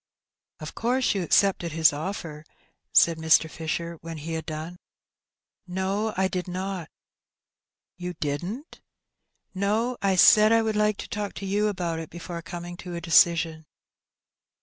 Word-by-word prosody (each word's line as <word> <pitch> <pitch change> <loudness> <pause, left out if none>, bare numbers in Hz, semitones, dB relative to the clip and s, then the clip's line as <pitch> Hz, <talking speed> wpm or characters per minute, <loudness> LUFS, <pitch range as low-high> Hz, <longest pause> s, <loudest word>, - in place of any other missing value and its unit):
" - - -65
Of 155 - -7
course 250 +2 +1
you 195 - -1
accepted 175 -1 +2
his 160 -2 +4
offer? 155 -1 -5 0.3
" - - -47
said 165 -1 +5
Mr. 160 0 +4
Fisher, 165 +1 -4
when 165 0 -7
he 160 +2 -6
had 160 -1 -4
done. 160 +3 -6 0.9
"No, 195 +4 -2
I 190 0 +2
did 185 0 -4
not." 185 -1 -4 1.1
"You 180 0 -5
didn't?" 175 - -5 0.4
" - - -54 0.2
No; 215 +6 0
I 195 -1 +2
said 215 +4 +7
I 230 0 +4
would 220 -1 -1
like 210 -1 +2
to - - -7
talk 210 -3 -4
to 195 - -7
you 205 +2 +1
about 175 -5 -2
it 160 - -7
before 170 0 -7
coming 175 0 -7
to 180 -1 -7
a - - -3
decision." 165 -1 +3
180 Hz, 160 wpm, -26 LUFS, 165-200 Hz, 1.1 s, said